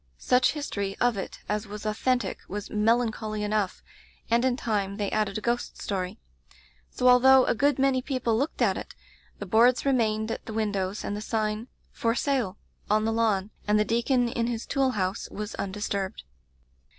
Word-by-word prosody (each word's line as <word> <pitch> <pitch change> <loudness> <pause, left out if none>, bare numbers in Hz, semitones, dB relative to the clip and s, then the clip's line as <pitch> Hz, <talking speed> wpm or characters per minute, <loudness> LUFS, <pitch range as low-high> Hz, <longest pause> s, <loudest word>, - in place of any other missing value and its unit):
Such 250 - +3
history 200 -10 -3
of 245 -2 +3
it 195 - -6
as 210 +1 -2
was 210 +1 -8
authentic 245 +4 0
was 205 +1 -6
melancholy 215 -1 +1
enough, 210 -2 -1 0.5
and 235 +1 +4
in 255 -1 +2
time 200 -5 -1
they 205 -2 -2
added 210 -2 0
a - - -4
ghost 240 +2 -2
story. 190 +1 -3 0.7
So 250 - 0
although 260 +1 +7
a - - +2
good 280 +3 +2
many 265 -1 +2
people 255 -4 -1
looked 280 +7 0
at - - +2
it, - - -8 0.4
the 205 - -6
boards 235 +7 +4
re 275 - +4
mained 220 -2 +1
at - - -6
the 220 - -5
windows 205 -2 -1
and 205 - -3
the 210 - -5
sign 215 +1 -2 0.2
'For 230 0 0
Sale' 245 -9 0 0.3
on 215 +1 +3
the 225 - +1
lawn, 215 -3 +1 0.2
and 210 0 +4
the 210 - +3
deacon 240 +2 +2
in 235 0 -1
his 235 -1 -3
tool 270 -2 +1
house 185 0 -2
was 210 +1 -6
undisturbed. 200 -1 -3
220 Hz, 180 wpm, -27 LUFS, 210-245 Hz, 0.7 s, although